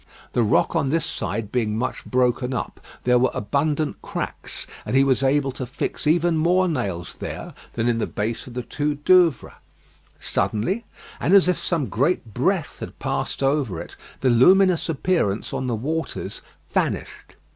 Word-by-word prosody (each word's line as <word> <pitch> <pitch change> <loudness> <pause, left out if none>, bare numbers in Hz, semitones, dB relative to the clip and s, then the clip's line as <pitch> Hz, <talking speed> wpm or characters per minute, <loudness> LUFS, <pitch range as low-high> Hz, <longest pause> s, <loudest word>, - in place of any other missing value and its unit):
The 120 - +2
rock 110 +8 +2
on 150 -5 +1
this 165 +3 +1
side 105 +3 -3
being 110 -4 0
much 125 +3 -2
broken 125 0 +1
up, - - -4 0.2
there 125 0 +4
were 130 - +3
abundant 145 +6 -1
cracks, - - -5 0.2
and - - -3
he 135 - +6
was 135 -2 +2
able 135 0 +2
to 130 -1 -6
fix 135 +3 -3
even 170 +1 +3
more 180 +4 +3
nails 100 - -2
there - - -6 0.2
than 115 0 0
in 115 -1 +2
the - - 0
base 110 +4 -3
of 125 - -10
the 125 - -2
two 145 +3 -1
Douvres. 165 -1 +3 0.7
Suddenly, 190 - -1 0.3
and 190 - +3
as 195 -2 +6
if 180 - +1
some 165 -6 0
great 120 - 0
breath 160 - 0
had - - -7
passed - - -2
over 135 - +1
it, - - -9 0.3
the 130 - +3
luminous 180 +8 +5
appearance 155 - 0
on 130 - -2
the 120 - 0
waters 160 +8 -3 0.3
vanished. - - -2
135 Hz, 165 wpm, -23 LUFS, 120-165 Hz, 0.7 s, he